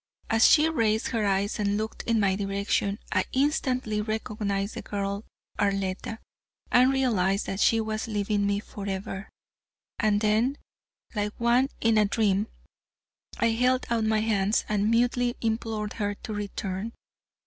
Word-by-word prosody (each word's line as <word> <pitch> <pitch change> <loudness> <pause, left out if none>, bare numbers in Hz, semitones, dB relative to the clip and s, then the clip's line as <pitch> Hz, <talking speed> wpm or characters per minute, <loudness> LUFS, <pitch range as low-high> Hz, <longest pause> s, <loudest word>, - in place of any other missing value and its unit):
As 225 +1 +6
she 310 0 +6
raised 225 -8 +1
her 225 -4 0
eyes 200 +2 0
and 205 0 +1
looked 220 +1 -4
in 230 -1 +3
my 195 -2 +2
direction, 200 0 -1
I - - +2
instantly 255 -6 +1
recognized 210 -2 -2
the - - -5
girl 200 +1 -3 0.3
Arletta, 195 +1 -1 0.5
and 250 +2 +5
realized 205 -8 +1
that 195 - -4
she 225 +2 +4
was 220 0 -2
leaving 205 -1 0
me 200 0 0
forever. 195 -1 -5 0.7
And 210 -2 +3
then, 220 +6 +2 0.6
like 210 -1 -2
one 240 +3 +3
in 225 -1 +4
a 210 - +4
dream, 205 0 +1 0.9
I 230 - +2
held 250 +3 +2
out 230 -1 +2
my 220 0 +2
hands 210 -1 +1
and 210 0 +1
mutely 245 +1 +2
implored 220 -2 -2
her 205 -1 -2
to 215 - -7
return. 205 +1 -4
215 Hz, 145 wpm, -27 LUFS, 200-230 Hz, 0.9 s, As